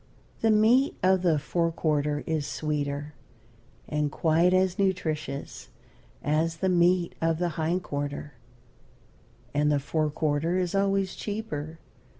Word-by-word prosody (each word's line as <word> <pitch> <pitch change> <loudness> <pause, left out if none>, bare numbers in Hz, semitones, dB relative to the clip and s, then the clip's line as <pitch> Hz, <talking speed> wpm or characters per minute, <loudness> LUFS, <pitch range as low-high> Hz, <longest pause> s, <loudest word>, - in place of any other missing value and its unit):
The 225 - +2
meat 225 +6 +4
of 185 0 +4
the 170 -4 +3
fore 165 +3 0
quarter 150 -2 0
is 155 -3 -1
sweeter, 145 -1 -3 0.7
and 150 -1 -1
quite 165 +3 +3
as 185 0 +2
nutritious 155 -7 -2 0.5
as 160 +3 0
the 190 - 0
meat 175 0 +3
of 165 -1 +1
the 175 +1 0
hind 170 +3 -1
quarter, 145 0 -4 1.2
and 150 +1 +2
the 145 - +2
fore 155 +2 -1
quarter 155 +3 0
is 180 -2 -1
always 195 -1 +1
cheaper. 165 -8 -5
160 Hz, 130 wpm, -27 LUFS, 150-185 Hz, 1.2 s, meat